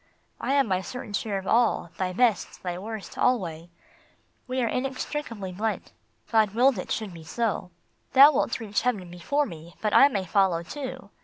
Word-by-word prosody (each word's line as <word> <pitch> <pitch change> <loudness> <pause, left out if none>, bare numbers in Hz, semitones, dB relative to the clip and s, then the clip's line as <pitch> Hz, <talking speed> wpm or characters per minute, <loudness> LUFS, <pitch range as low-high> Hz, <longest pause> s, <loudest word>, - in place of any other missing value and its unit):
I 270 - -1
have 280 -1 +4
my 190 -3 0
certain 245 0 -7
share 205 0 -1
of 190 - -6
all, 230 -7 +2
thy 185 -1 0
best, 225 0 +1
thy 180 -1 -3
worst, 215 +1 -7
alway: 175 -9 0 0.8
We 255 +1 -2
are - - +1
inextricably 255 -5 -3
blent. 215 +4 -3 0.4
God 215 -3 +3
willed 250 -2 +4
it - - -6
should 215 -4 -2
be 165 -1 -10
so. 205 +1 -2 0.2
" - - -41
Thou 275 +3 +9
wilt 245 - 0
reach 210 -3 -1
heaven 205 -8 -1
before 285 +12 0
me, 170 - -10
but 215 -1 -1
I 275 - +8
may 200 -9 -2
follow 185 -2 +2
too. 260 - -7
215 Hz, 180 wpm, -26 LUFS, 185-250 Hz, 0.8 s, Thou